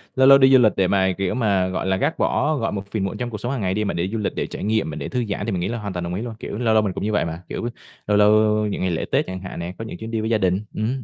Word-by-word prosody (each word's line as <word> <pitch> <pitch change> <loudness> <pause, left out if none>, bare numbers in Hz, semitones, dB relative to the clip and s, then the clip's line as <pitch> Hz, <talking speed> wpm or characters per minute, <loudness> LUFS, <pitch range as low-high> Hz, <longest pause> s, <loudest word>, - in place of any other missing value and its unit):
lâu 130 0 +5
lâu 135 0 +9
đi 135 0 +5
du 130 - +8
lịch 110 -3 +5
để 95 -1 +3
mà 95 -1 +2
kiểu 95 -2 -1
mà, 100 -6 +1
gọi 95 0 -3
là, 95 - +1
gác - - 0
bỏ, 155 +1 +1
gọi, 115 - -1
một 100 -1 -6
phiền 105 -3 -1
muộn 95 - -4
trong 120 -1 -3
cuộc 105 - -5
sống 120 +5 -4
hàng 135 - -2
ngày 95 -1 0
đi 105 +1 0
mà - - -1
để 85 +2 -1
du 110 +3 -3
lịch 105 - -2
để - - -2
trải - - -7
nghiệm 110 -4 0
mà 75 - -5
để - - -5
thư 125 -2 -1
giãn 100 +1 -2
thì 115 - -2
mình 90 - -1
nghĩ - - -1
là 120 - -3
hoàn 100 -3 -5
toàn 90 -1 -3
đồng 85 +1 -3
ý 105 - -3
luôn, 115 -2 -5
kiểu, 105 - -5
lâu 115 -2 +1
lâu 110 -1 +4
mình 95 -3 -1
cũng - - -5
như 110 - 0
vậy 105 - +1
mà, 85 +2 -6
kiểu, 120 - -3 0.4
lâu 105 -1 +3
lâu 105 0 +6 0.4
những 100 - -3
ngày 90 -1 0
lễ 80 - -2
Tết - - +2
chẳng 95 0 -5
hạn 95 - -7
nè, 85 +2 -5
có 115 - -6
những 110 - -7
chuyến 110 +3 -7
đi 110 -1 -1
với 110 - -2
gia 110 - +3
đình, 95 +2 0
ừm 110 - -2
hứm, 130 +1 -2
105 Hz, 380 wpm, -22 LUFS, 95-115 Hz, 0.4 s, lâu